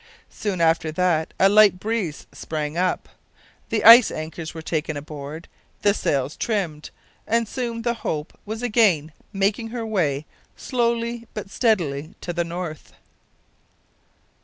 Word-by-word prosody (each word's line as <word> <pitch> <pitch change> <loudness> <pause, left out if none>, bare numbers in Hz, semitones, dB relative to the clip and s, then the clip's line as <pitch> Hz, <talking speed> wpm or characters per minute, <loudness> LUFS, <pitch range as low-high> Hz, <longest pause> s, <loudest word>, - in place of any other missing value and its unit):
Soon 195 -5 -3
after 160 -1 +2
that 165 -2 +1
a 195 - +6
light 205 -2 +6
breeze 205 -7 -3
sprang 155 -1 -4
up, 180 +1 0 0.6
the 220 - 0
ice 230 +1 +10
anchors 155 +1 -6
were 160 -1 -8
taken 160 -1 -2
aboard, 150 +2 -8 0.4
the 205 - +5
sails 140 -7 -1
trimmed, 180 -9 -2 0.4
and 230 0 +1
soon 235 -1 -4
the 235 0 +1
Hope 150 0 -3
was 220 +3 -6
again 205 -10 +3 0.2
making 205 +3 0
her 230 0 -5
way 155 -10 0 0.3
slowly 235 -1 -1
but 205 -2 -6
steadily 170 - 0
to 175 - -4
the 170 0 0
north. 170 -3 -6
180 Hz, 135 wpm, -23 LUFS, 155-225 Hz, 0.6 s, ice